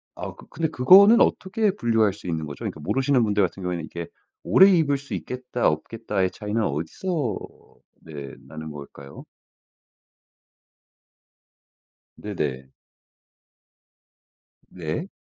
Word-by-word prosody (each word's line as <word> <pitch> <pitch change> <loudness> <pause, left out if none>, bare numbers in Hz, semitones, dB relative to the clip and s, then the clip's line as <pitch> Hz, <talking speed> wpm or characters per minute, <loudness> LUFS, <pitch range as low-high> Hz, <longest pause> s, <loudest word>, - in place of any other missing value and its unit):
아 - - -7
그 - - -15
근데 165 - -1
그거는 195 - +7
어떻게 205 +1 +1
분류할 115 - +2
수 105 - -11
있는 80 -2 -2
거죠? 75 - -8
그러니까 - - -5
모르시는 130 - +1
분들 105 -1 +1
같은 95 +1 -3
경우에는 90 -2 -3
이게 85 0 -7 0.4
오래 190 +1 +6
입을 155 -6 +3
수 140 -4 -9
있겠다, 125 +7 -2
없겠다의 100 +3 -2
차이는 105 +2 -3
어디서 110 - -2 0.6
네 70 -4 -9
나는 80 +1 -8
걸까요? 70 -1 -11 2.9
네네. 70 -10 -4 2.0
네. 90 - -4
105 Hz, 250 characters per minute, -24 LUFS, -, 2.9 s, 그거는